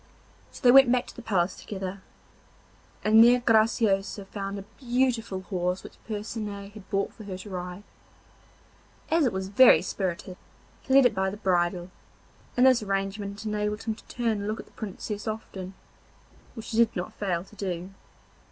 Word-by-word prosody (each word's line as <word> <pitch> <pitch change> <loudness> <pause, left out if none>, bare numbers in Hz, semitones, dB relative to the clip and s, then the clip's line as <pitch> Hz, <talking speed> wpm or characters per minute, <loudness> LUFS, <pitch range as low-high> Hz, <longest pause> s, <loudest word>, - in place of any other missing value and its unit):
So - - -12
they 245 - +8
went 265 -1 +8
back 250 -1 +2
to - - -12
the - - -8
palace 185 -5 0
together, 190 -1 -6 1.0
and 220 +1 +7
there 245 +1 +6
Graciosa 215 -4 +2
found 195 0 -5
a 195 - -6 0.2
beautiful 240 -6 0
horse 180 -1 -2
which - - -13
Percinet 210 -2 -5
had 210 -2 -13
brought 195 0 -1
for 220 - -12
her 190 -2 -5
to 190 +3 -10
ride. 180 +1 -6 1.3
As 320 -4 +4
it - - 0
was 190 0 -4
very 205 -5 +7
spirited 185 0 -4 0.4
he 265 - 0
led 275 -1 +8
it 245 - +4
by 190 -1 0
the 200 - -7
bridle, 180 -2 0 0.7
and 250 - +6
this 255 -3 +5
arrangement 200 +1 -3
enabled 210 0 -2
him 225 - -1
to 215 - -15
turn 240 -2 -2
and 200 - -4
look 215 +1 -2
at - - -8
the - - -23
Princess 210 0 -6
often, 195 -3 -6 0.8
which 225 -2 -8
he 225 - -2
did 235 0 +4
not 180 - -4
fail 180 -4 -2
to 205 - -18
do. 185 -2 -4
205 Hz, 175 wpm, -27 LUFS, 190-225 Hz, 1.3 s, they